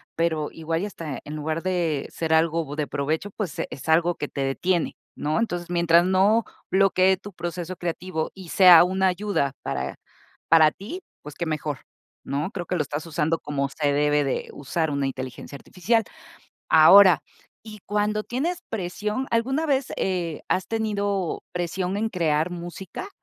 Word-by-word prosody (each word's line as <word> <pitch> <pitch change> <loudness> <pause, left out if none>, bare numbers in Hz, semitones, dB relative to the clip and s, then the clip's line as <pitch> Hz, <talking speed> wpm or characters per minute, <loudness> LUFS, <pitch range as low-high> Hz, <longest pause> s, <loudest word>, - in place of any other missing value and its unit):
pero 160 -2 0
igual 165 +2 -3
y - - 0
hasta 160 -9 -6
en 150 - -6
lugar 155 +2 -3
de 170 -6 -1
ser 160 -1 -1
algo 160 -2 +1
de 150 -2 -1
provecho, 155 +7 -2
pues, 190 -7 -5
es 140 - -8
algo 170 +2 +3
que 145 - -5
te 140 - -4
detiene, 170 +6 0 0.2
¿no? 155 +5 0
Entonces, 175 -7 -2
mientras 170 0 +4
no 195 +5 +3 0.3
bloquee 190 -1 +4
tu 205 +2 -11
proceso 175 +1 -5
creativo 170 -1 -3
y 185 -3 -11
sea 180 -3 +8
una 190 +1 +1
ayuda 185 -6 0
para - - -3 0.5
para 155 -2 +6
ti, 235 - -8 0.2
pues, 150 0 -9
qué 170 - -3
mejor, 150 -3 -3 0.5
¿no?, 145 +7 -2
creo 175 -3 -5
que 180 - -2
lo 170 - +1
estás 145 +2 -5
usando 160 0 0
como 140 -1 -2
se 145 +1 0
debe 145 0 +2
de 135 - -2
usar 160 +3 -2
una 140 -1 0
inteligencia 130 +1 -6
artificial. 220 +10 0 0.7
Ahora, 180 +3 +8 0.4
y 215 -1 -10
cuando 210 +1 0
tienes 320 +9 -2
presión 210 +5 -3
¿alguna 265 +7 +1
vez, 275 -2 0
eh, 175 -4 -2
has 185 - 0
tenido 205 -5 -2
presión 180 +2 -2
en 220 +2 0
crear 165 -4 0
música? 175 - -7
175 Hz, 165 wpm, -24 LUFS, 155-195 Hz, 0.7 s, sea